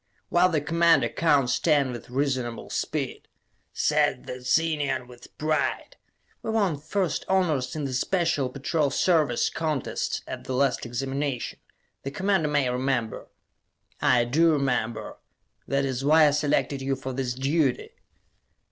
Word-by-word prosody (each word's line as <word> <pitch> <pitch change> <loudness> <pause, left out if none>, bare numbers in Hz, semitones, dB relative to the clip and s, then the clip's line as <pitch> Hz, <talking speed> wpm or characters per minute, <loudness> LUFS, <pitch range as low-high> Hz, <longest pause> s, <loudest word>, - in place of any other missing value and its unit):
"While 180 +1 +4
the 155 -4 0
Commander 165 +2 +3
counts 145 -6 +2
ten 145 -5 +2
with 120 -1 -8
reasonable 130 -3 -2
speed," - - -3 0.4
said 60 - +1
the 125 - -7
Zenian 140 -2 0
with 125 -1 -15
pride. 155 0 -1 0.5
"We - - -5
won 200 -9 +1
first 170 +2 -1
honors 160 -9 +1
in 150 -2 -3
the 135 - -3
Special 165 -1 0
Patrol 140 +3 0
Service 150 -5 +2
contests 155 -5 -2
at - - -7
the 130 - -3
last 135 -2 +1
Examination, 135 +1 -3 0.4
the 135 - -4
Commander 190 +1 +1
may 145 -3 +2
remember." 125 -3 -2 0.7
"I 120 -1 +4
do 160 +7 +3
remember. 125 -6 -1 0.5
That 140 0 +1
is 130 -1 -3
why 155 +2 +6
I - - +3
selected 145 -1 0
you 135 0 -1
for 130 0 -6
this 125 -2 -2
duty." 135 -1 0
140 Hz, 140 wpm, -26 LUFS, 130-160 Hz, 0.7 s, why